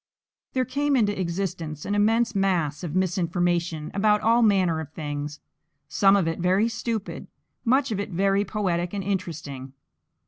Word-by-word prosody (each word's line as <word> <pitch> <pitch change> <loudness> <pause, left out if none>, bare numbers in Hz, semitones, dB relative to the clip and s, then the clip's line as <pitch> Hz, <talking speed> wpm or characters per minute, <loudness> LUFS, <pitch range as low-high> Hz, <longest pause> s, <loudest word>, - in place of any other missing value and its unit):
There 255 -1 +1
came 285 +3 0
into 205 -5 +1
existence 170 -4 -3
an 205 - -2
immense 225 +3 +2
mass 180 -7 0
of 170 -2 -4
misinformation 175 -3 0
about 210 +1 +3
all 230 +2 +4
manner 190 -7 +3
of 160 -1 -7
things; 145 -1 -5 0.5
some 195 +7 +4
of 190 -5 +2
it 165 +1 -2
very 185 +5 +3
stupid, 230 -2 -4 0.4
much 260 +2 +2
of 205 - -1
it 200 - -3
very 195 +2 +2
poetic 180 -4 -2
and 195 - -3
interesting. 160 -9 -4
190 Hz, 150 wpm, -25 LUFS, 165-210 Hz, 0.5 s, all